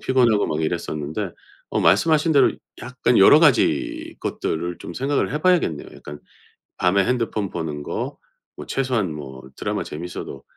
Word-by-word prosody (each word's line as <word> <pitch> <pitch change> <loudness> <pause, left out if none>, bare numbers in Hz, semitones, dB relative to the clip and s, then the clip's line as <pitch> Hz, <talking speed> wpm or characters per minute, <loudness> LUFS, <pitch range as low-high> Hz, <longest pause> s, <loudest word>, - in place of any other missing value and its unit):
피곤하고 120 -5 +3
막 75 +1 -2
이랬었는데 80 -2 -3 0.4
어 - - 0
말씀하신 160 0 +3
대로 140 -3 +5 0.3
약간 125 -1 0
여러 100 +9 +8
가지 135 - +2
것들을 85 +2 -3
좀 - - -8
생각을 135 +2 -1
해 150 - -2
봐야겠네요. 175 - +1
약간 75 0 -10 0.6
밤에 95 +2 +2
핸드폰 115 -5 -1
보는 75 -4 -4
거 - - -4 0.4
뭐 - - -7
최소한 125 - -1
뭐 65 -3 -9
드라마 - - -3
재밌어도 75 -4 -7
100 Hz, 330 characters per minute, -22 LUFS, 80-130 Hz, 0.6 s, 여러